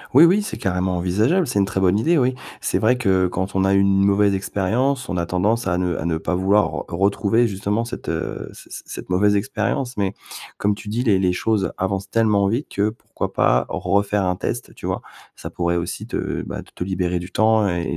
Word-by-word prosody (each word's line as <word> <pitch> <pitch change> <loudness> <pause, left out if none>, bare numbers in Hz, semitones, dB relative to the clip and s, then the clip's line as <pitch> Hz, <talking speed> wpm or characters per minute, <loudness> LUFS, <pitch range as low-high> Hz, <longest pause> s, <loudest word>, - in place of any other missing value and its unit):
Oui, - - +9
oui, 190 +5 +4
c'est 210 - -5
carrément 90 -1 -1
envisageable, 110 - +2
c'est 120 -6 0
une 100 - +3
très 95 0 -2
bonne 95 +2 +3
idée 165 +8 +3
oui. 130 -2 +2 0.3
C'est - - 0
vrai 125 +3 +3
que 95 -6 +2
quand 95 +2 -3
on 95 - +2
a 95 0 +3
eu - - +5
une 100 0 +3
mauvaise 100 0 +3
expérience, 120 +8 0
on 90 - -3
a 85 - 0
tendance 105 +6 0
à 90 -2 +1
ne 90 -2 0
à 80 - -4
ne 85 -1 0
pas 80 - -3
vouloir 95 +3 +3
re - - -5
retrouver 100 +5 +2
justement 105 +3 -1
cette, 120 - -7
heu, 80 -1 -4
c - - -15
c - - -7
cette - - -8
mauvaise 105 +3 +3
expérience, 110 +3 -2
mais 100 -1 -1 0.4
comme 105 0 +1
tu 105 +1 -9
dis 115 +4 -1
les 105 -6 +3
les 90 -1 +2
choses 105 0 0
avancent 95 0 -2
tellement 105 -3 +2
vite 120 +8 -1
que 100 +1 +2
pourquoi 110 - -6
pas 60 - +2
refaire 100 0 0
un 90 0 0
test - - -4
tu - - -7
vois? - - -2 0.3
Ça - - -8
pourrait 85 -1 -1
aussi 85 0 -4
te, - - -3
bah, - - -6
t - - -21
te - - -4
libérer 90 -1 -1
du 90 +2 -8
temps 110 0 +3
et 85 -1 -1
100 Hz, 230 wpm, -21 LUFS, 90-110 Hz, 0.4 s, Oui